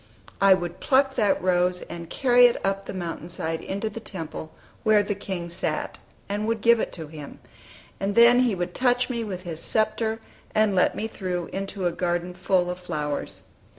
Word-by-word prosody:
I 195 -1 +7
would 175 -1 -5
pluck 270 0 +3
that 210 -6 +2
rose, 180 0 +2
and 170 -1 -8
carry 245 +1 +5
it 240 - -1
up 195 0 -1
the - - -5
mountain 170 -1 -5
side 165 -1 -2
into 200 +3 -3
the 215 +1 -5
temple 160 -6 -7 0.3
where 215 -2 +5
the 205 - -1
King 190 -3 -5
sat, 170 - -3 0.3
and 205 +2 -2
would 225 -1 -1
give 235 +1 +5
it - - -2
to 165 -3 -6
Him; 150 -1 -10 0.6
and 200 +1 -1
then 235 +1 +7
He 245 -5 +2
would 175 0 -3
touch 250 0 +2
me 235 -2 -2
with 185 -4 -5
his 165 -3 -5
sceptre, 220 0 +1 0.4
and 215 -1 +3
let 185 - +3
me 220 - -2
through 180 -5 -4
into 195 -1 -4
a 175 - +2
garden 175 0 -2
full 180 0 +1
of 180 - -6
flowers. 150 -5 -4
195 Hz, 190 wpm, -25 LUFS, 175-220 Hz, 0.6 s, I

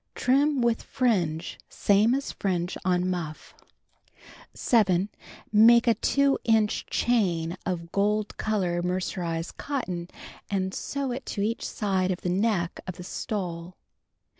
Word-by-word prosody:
Trim 275 +2 +2
with 235 -1 +2
fringe 180 -10 -1
same 210 +5 +3
as 275 +1 -3
fringe 180 -2 -2
on 180 0 +1
muff. 170 -4 -4 1.0
7. 200 -5 +2 0.4
Make 230 +2 +7
a 235 - +5
2 280 +5 +2
inch 220 -2 +2
chain 180 -8 +1
of 170 -2 -3
gold 210 +1 0
color 185 -5 0
mercerized 175 -2 -3
cotton 185 -12 -3 0.4
and 190 -1 -1
sew 280 -2 -3
it 250 +1 -5
to 200 - -2
each 225 +2 -1
side 190 -3 0
of 185 -1 -2
the 180 - -2
neck 185 -2 0
of 185 - -4
the 180 - -9
stole. 180 -3 -4
195 Hz, 130 wpm, -27 LUFS, 175-230 Hz, 1.0 s, Make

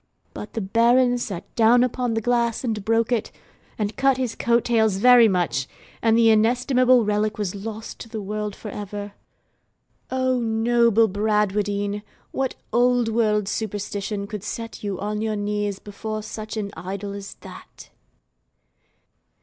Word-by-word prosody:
But 210 - -8
the 225 - -2
Baron 240 +5 +3
sat 195 -7 -6
down 235 +2 +5
upon 250 -2 -1
the 225 - 0
glass 235 0 0
and 220 -5 -2
broke 225 +2 +1
it, 235 -3 0 0.5
and 210 -1 -2
cut 270 -1 +3
his 255 -3 -2
coat 235 -1 +1
tails 220 -4 +2
very 240 +3 +7
much; 170 - 0 0.3
and 225 0 +3
the 230 -1 +6
inestimable 250 +2 +3
relic 210 +1 0
was 205 -4 -2
lost 220 +2 -7
to 230 - -9
the 220 -1 -5
world 210 0 -4
for 215 - -8
ever. 205 0 -6 1.0
O 260 -1 +1
noble 230 0 +3
Bradwardine! 205 0 0 0.3
what 265 -1 -2 0.2
old 245 -1 +3
world 215 -3 +1
superstition 205 -1 -3
could 210 -1 -7
set 230 +2 -6
you 200 -3 -3
on 210 +1 -3
your 220 -1 -1
knees 205 -1 -2
before 215 +2 -6
such 215 +1 -7
an 200 -2 -3
idol 195 +4 -5
as 200 -1 -8
that? - - -13
220 Hz, 150 wpm, -23 LUFS, 205-235 Hz, 1.0 s, very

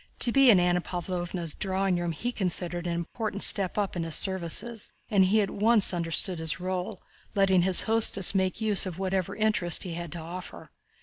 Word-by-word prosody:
To 240 - +3
be 275 +1 +5
in 200 -5 +6
Anna 180 0 +1
Pávlovna's 175 -2 -5
drawing 190 -2 -1
room 175 -1 -2
he 235 +10 -4
considered 175 -4 -3
an 170 - -2
important 200 +4 -4
step 195 -2 +3
up 205 -2 -2
in 175 - -3
the 165 0 -5
service, 190 +6 -1 0.2
and 195 -3 +4
he 215 +4 +2
at 200 - -2
once 215 -1 +3
understood 170 +1 0
his 160 +1 -1
role, 185 0 -5 0.3
letting 190 -2 +3
his 185 0 +3
hostess 220 -4 +4
make 190 0 -1
use 210 -3 +3
of 175 -3 -7
whatever 190 -1 -2
interest 210 -6 +1
he 180 - -6
had 170 -1 -7
to 170 - -7
offer. 175 +3 -9
185 Hz, 190 wpm, -27 LUFS, 175-205 Hz, 0.3 s, in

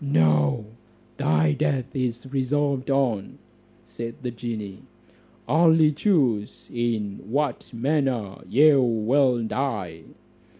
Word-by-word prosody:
"No, 75 - +2 0.5
thy 75 0 +2
death 130 - -1
is 120 -2 -2
resolved 135 +1 -1
on," 130 -8 0 0.5
said 115 0 -7
the 125 - -3
genie, 110 -5 -6 0.7
"only 160 -1 +4
choose 140 - 0
in 115 -4 -2
what 140 0 -2
manner 125 -5 -1
you 145 +1 +5
will 120 +2 +2
die." 105 -11 -3
120 Hz, 95 wpm, -24 LUFS, 105-140 Hz, 0.7 s, you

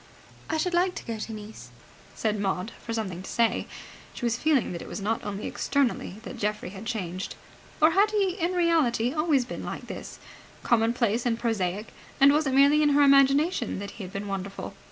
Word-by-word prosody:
"I 320 - 0
should 355 +3 -1
like 360 +1 +2
to - - -7
go 230 -2 -4
to 225 - -5
Nice," 215 0 -9 0.5
said 215 -2 -1
Maud, 195 +1 -1
for 230 - -5
something 200 -6 -3
to 190 - -9
say. 230 -1 +1 0.5
She 240 - -4
was 235 -1 +1
feeling 290 +1 +2
that 170 - -5
it - - -9
was - - -5
not 215 +3 -1
only 205 0 -4
externally 275 -8 -1
that - - -8
Geoffrey 210 -3 -2
had 200 +3 -8
changed. 185 -5 -4 0.4
Or 310 +2 +6
had 400 +4 +4
he 405 -3 +1
in 345 +2 0
reality 305 -9 +2
always 305 -5 +2
been 245 - -6
like - - -6
this, - - -8 0.5
commonplace 235 0 +2
and 230 -1 +1
prosaic, 210 -3 -2 0.3
and 280 +1 +7
was 300 0 +2
it 265 - 0
merely 285 +2 +6
in 300 - +4
her 290 0 +5
imagination 275 0 +4
that 200 +1 -6
he 210 - -9
had 185 - -8
been 200 +1 -5
wonderful? 195 0 -5
235 Hz, 200 wpm, -27 LUFS, 205-295 Hz, 0.5 s, and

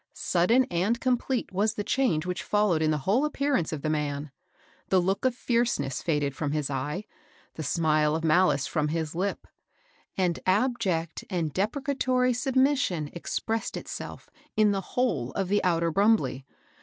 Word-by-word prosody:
Sudden 225 +9 +3
and 195 +7 +1
complete 255 0 0
was 210 +3 0
the 205 - -2
change 200 -9 +1
which 180 0 -3
followed 205 -6 +1
in 155 - +2
the 155 - +1
whole 230 +9 +3
appearance 280 - 0
of 155 -3 -5
the 155 - 0
man. 145 -1 -2 0.6
The 190 - +4
look 195 +6 0
of 255 -2 +2
fierceness 230 - 0
faded 145 -4 0
from 145 -1 -2
his 150 -2 -1
eye, 145 +9 -3 0.5
the - - -6
smile 155 0 +2
of 165 - -3
malice 160 -3 +3
firom 150 -2 0
his 160 -1 -2
lip, 190 +4 -2 0.7
and 180 -3 +1
abject 185 -6 0
and 165 -6 -2
depre 215 +9 -1
catory 255 -3 +1
submission 260 - +1
expressed 225 +6 -3
itself - - -7 0.3
in 215 -1 +5
the 195 -1 -1
whole 165 - -1
of 195 -2 -2
the 205 +1 +2
outer 170 -2 +2
Brumbley. 195 - +2
185 Hz, 160 wpm, -27 LUFS, 155-230 Hz, 0.7 s, in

